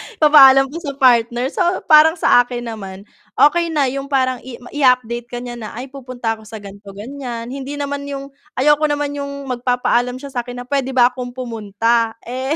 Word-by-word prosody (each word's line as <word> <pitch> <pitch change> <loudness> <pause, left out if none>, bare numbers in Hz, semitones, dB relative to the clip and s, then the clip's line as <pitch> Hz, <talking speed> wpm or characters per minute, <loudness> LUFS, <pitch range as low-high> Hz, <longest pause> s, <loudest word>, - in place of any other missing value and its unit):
ipapaalam 270 -4 +6
pa 330 - -6
sa 285 -5 -5
partner. 245 -2 +3
So, 360 0 -1
parang 315 +1 +6
sa 285 - +4
akin 245 0 -1
naman, 195 -2 -9 0.3
okey 340 +3 +4
na 275 -3 +1
yung 275 0 -5
parang 260 -3 0 0.3
i-update 250 -4 +1
ka 245 0 -7
niya 240 -1 -7
na, 215 -1 -8
ay 260 +2 -8
pupunta 245 -4 -5
ako 215 - -15
sa 220 -2 -9
ganito 200 0 -12
ganyan. 240 +1 -7
Hindi 275 +1 -6
naman 285 0 -4
yung 275 0 -7 0.2
ayoko 295 +3 +3
naman 290 -1 -2
yung 280 -1 -6
magpapaalam 245 0 0
siya 275 +1 -9
sa 245 -1 -4
akin 245 0 -7
na - - -19
pwede 265 -1 -2
ba 245 0 +5
akong 250 -1 -7
pumunta, 230 -1 -1
eh 260 +5 -3
255 Hz, 185 wpm, -18 LUFS, 240-280 Hz, 0.3 s, ipapaalam